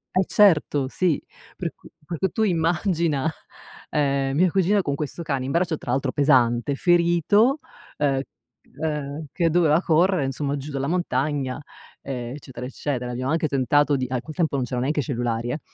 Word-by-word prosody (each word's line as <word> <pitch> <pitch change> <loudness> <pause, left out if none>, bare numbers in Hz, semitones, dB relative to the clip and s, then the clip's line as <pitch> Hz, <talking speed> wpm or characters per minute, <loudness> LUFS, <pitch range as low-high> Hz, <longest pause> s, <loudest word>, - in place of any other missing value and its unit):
Eh 185 +1 +3
certo, 150 -8 +4
sì. 175 -2 +1 0.4
Per - - -3
cu - - -17 0.2
per 165 0 -5
cui 190 -3 0
tu 220 - 0
immagina 170 -4 +1 0.6
ehm, 140 -2 0
mia 180 -1 +4
cugina 195 +1 +2
con 140 - -1
questo 150 +4 -4
cane 135 -4 -2
in 135 - -3
braccio 170 -1 +1
tra - - -9
l'altro 130 +1 0
pesante, 130 -2 +3
ferito, 175 - +3 0.4
ehm, 140 -2 +1 0.6
ehm 150 -1 -3
che 170 -3 +1
doveva 165 -1 +3
correre 175 -1 +3
insomma 140 +1 -2
giù 140 +2 -6
dalla 135 -1 -2
montagna, 145 -5 -1 0.4
ehm, 125 -1 -5
eccetera, 130 -3 -8
eccetera. 130 -3 -3
Abbiamo 130 +3 -2
anche 160 -1 +1
tentato 145 +2 +2
di 130 - -1
a 125 -1 -2
quel 155 +1 -10
tempo 165 -5 0
non 130 -2 0
c'erano 125 0 -3
neanche 145 +2 0
cellulari 120 -3 -2
eh, 145 +5 -2
145 Hz, 170 wpm, -24 LUFS, 135-170 Hz, 0.6 s, certo